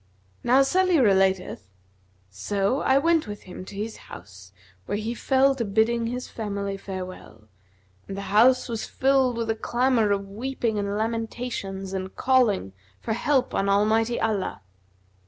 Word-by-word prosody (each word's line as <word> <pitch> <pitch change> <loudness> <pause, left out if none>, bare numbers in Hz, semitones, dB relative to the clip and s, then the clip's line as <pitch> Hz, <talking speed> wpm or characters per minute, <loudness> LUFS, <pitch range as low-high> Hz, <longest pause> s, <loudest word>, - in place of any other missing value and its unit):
Now 260 +3 +5
Salih 365 +3 +2
relateth: 190 - +2 0.6
"So 195 - -1
I 265 - +3
went 325 -1 +2
with 205 0 -7
him 185 0 -9
to 200 - -10
his 215 +2 -5
house 95 -1 -13 0.4
where 205 - -1
he 220 +2 -3
fell 270 +3 +3
to 260 -3 -3
bidding 225 +3 +1
his 250 +2 -4
family 200 -2 -4
farewell, 185 - -8 0.6
and 195 - -6
the - - -4
house 250 +4 +5
was 230 -3 -4
filled 265 -2 +2
with 230 -1 -1
a - - -1
clamour 240 -1 +1
of 200 -1 0
weeping 230 +1 -2
and 200 0 -2
lamentations 220 -4 -4
and 190 0 -5
calling 230 - +2 0.3
for 220 - -3
help 265 +3 +1
on 195 - 0
Almighty 220 +4 +2
Allah. 210 - -2
220 Hz, 150 wpm, -25 LUFS, 195-250 Hz, 0.6 s, Now